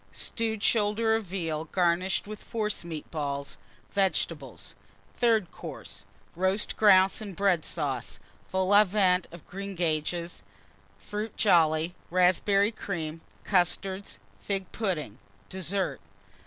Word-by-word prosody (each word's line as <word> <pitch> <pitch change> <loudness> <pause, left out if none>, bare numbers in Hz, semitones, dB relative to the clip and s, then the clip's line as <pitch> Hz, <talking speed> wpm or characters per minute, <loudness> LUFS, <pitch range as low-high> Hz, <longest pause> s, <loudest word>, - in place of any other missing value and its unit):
Stewed 220 -2 -1
Shoulder 220 +1 +3
of 225 -1 -2
Veal, 165 -4 -3
garnished 180 +2 +1
with 215 +1 -8
Forcemeat 195 -8 -4
Balls. 140 -3 -4 0.3
Vegetables. 195 -2 -1 0.4
THIRD 225 -7 +2
COURSE. - - -9 0.3
Roast 190 +4 +1
Grouse 195 -1 +5
and 200 -4 -7
Bread 190 -5 +2
Sauce. 135 -7 -3 0.3
Vol 190 +1 +1
au 205 +1 +9
Vent 185 -3 +2
of 170 -1 -12
Greengages. 175 -3 -2 0.6
Fruit 210 +1 -5
Jolly. 165 -4 +3 0.2
Raspberry 185 +3 +3
Cream. 165 -7 -5 0.2
Custards. 190 +1 0 0.2
Fig 195 - -3
Pudding. 155 - -2 0.3
DESSERT. 190 +1 -2
185 Hz, 105 wpm, -28 LUFS, 170-205 Hz, 0.6 s, au